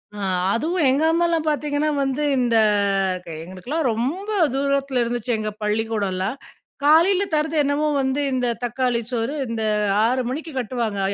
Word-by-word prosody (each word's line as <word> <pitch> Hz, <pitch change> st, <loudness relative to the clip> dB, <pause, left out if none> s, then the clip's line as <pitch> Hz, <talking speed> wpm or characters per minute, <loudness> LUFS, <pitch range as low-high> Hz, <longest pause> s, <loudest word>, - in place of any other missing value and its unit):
அ. -, -, -8 dB, 0.4 s
அதுவும் 320 Hz, +6 st, 0 dB
எங்க 275 Hz, +4 st, +2 dB
அம்மாலாம் 335 Hz, -1 st, +1 dB
பாத்தீங்கன்னா 295 Hz, 0 st, 0 dB, 0.2 s
வந்து 270 Hz, +2 st, -1 dB
இந்த 240 Hz, -2 st, +2 dB, 0.7 s
க -, -, -21 dB, 0.2 s
எங்களுக்குலாம் 215 Hz, -, -3 dB
ரொம்ப 295 Hz, -, -3 dB, 0.2 s
தூரத்துல 275 Hz, -1 st, 0 dB
இருந்துச்சு 240 Hz, 0 st, -2 dB
எங்க 215 Hz, 0 st, -2 dB
பள்ளிக்கூடலாம். 210 Hz, 0 st, -1 dB, 0.5 s
காலையில 340 Hz, +6 st, +5 dB
தரது 305 Hz, +1 st, 0 dB
என்னவோ 285 Hz, +2 st, 0 dB
வந்து 265 Hz, +2 st, 0 dB
இந்த 250 Hz, -1 st, 0 dB, 0.2 s
தக்காளி 245 Hz, 0 st, 0 dB
சோறு 235 Hz, +4 st, -2 dB
இந்த 230 Hz, -1 st, -3 dB, 0.4 s
6:00 255 Hz, +3 st, +1 dB
மணிக்கு 310 Hz, +5 st, -5 dB
கட்டுவாங்க. 230 Hz, -4 st, -2 dB
260 Hz, 135 wpm, -22 LUFS, 230-300 Hz, 0.7 s, காலையில